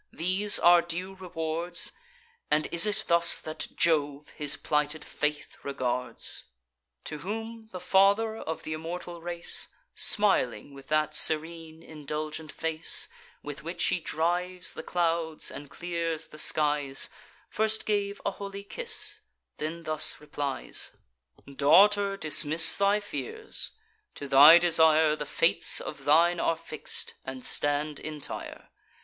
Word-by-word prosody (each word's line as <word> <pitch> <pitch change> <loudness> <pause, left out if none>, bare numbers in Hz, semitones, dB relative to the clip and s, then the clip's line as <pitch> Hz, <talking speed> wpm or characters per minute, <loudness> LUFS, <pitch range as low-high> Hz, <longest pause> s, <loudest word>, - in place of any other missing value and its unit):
these 185 +5 +3
our 175 0 +6
due 180 +3 -5
rewards? 170 -2 -3 0.6
And 150 +1 +2
is 170 +5 +4
it 210 - 0
thus 170 0 +5
that 155 0 -5
Jove 150 -3 +1
his 145 -1 -3
plighted 150 0 -1
faith 150 0 -4
regards?" 125 -2 -3 0.6
To 150 - -7
whom 225 +4 -6
the 185 - -7
Father 200 +4 +3
of 160 -6 -6
th' - - -7
immortal 170 +2 -6
race, 170 0 -1 0.3
Smiling 145 - +1
with 135 -1 -13
that 155 0 +1
serene 160 +1 -1
indulgent 155 +1 -6
face, 160 0 0 0.3
With 145 0 -7
which 170 +2 -4
he - - +1
drives 175 +3 -2
the - - -7
clouds 165 -2 -1
and 145 -1 -9
clears 170 -2 -4
the 155 - -9
skies, 145 -3 +2 0.4
First 220 0 0
gave 205 -1 -1
a - - +1
holy 200 0 -8
kiss; 455 - 0 0.4
then 165 +2 -5
thus 155 -1 0
replies: 145 -2 -4 0.5
"Daughter, 195 +9 +4
dismiss 160 -1 +3
thy 200 +1 +2
fears; 440 - -5 0.5
to 140 - -7
thy 145 +5 +9
desire 160 -2 +4
The 150 -1 -6
fates - - +4
of - - -8
thine 170 +4 +4
are 165 - +1
fix'd, 160 -2 -4
and 130 -1 -6
stand 145 0 -1
entire. 150 -2 -7
165 Hz, 130 wpm, -28 LUFS, 150-185 Hz, 0.6 s, thy